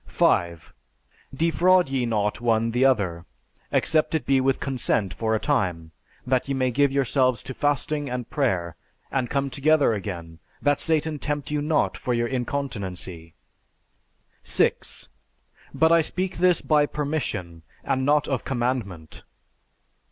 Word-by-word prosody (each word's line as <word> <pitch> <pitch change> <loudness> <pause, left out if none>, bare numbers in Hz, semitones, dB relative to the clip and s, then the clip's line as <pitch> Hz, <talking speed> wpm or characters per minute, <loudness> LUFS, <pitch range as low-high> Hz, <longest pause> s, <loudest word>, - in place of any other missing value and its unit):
5. 85 -2 +1 0.6
Defraud 170 +4 +3
ye 130 -3 0
not 105 0 -1
one 115 -1 +1
the 120 +3 +1
other, 95 -10 +1 0.4
except 160 0 +2
it 150 -6 -1
be 135 -1 +3
with 135 0 +1
consent 115 -8 -1
for 110 -1 0
a - - 0
time, 90 - -1 0.3
that 130 +1 +1
ye 135 - -1
may 130 -1 +1
give 140 +3 +2
yourselves 130 -2 +1
to 130 - -6
fasting 145 +1 -1
and 125 -1 -4
prayer; 95 - 0 0.4
and 130 -3 -1
come 140 -1 -1
together 145 -2 +3
again, 85 -5 -6 0.2
that 145 -1 +1
Satan 160 -2 0
tempt 145 -1 -3
you 150 -1 0
not 150 +1 +1
for 125 - -1
your 120 0 +1
incontinency. 100 - -4 1.1
6. - - 0 0.6
But 160 0 +3
I 165 0 +6
speak 185 +3 -3
this 180 -1 +4
by 150 -1 +3
permission, 125 - -3 0.2
and 130 - 0
not 150 +2 +2
of 135 -3 -1
commandment. 120 - -3
130 Hz, 140 wpm, -24 LUFS, 110-145 Hz, 1.1 s, I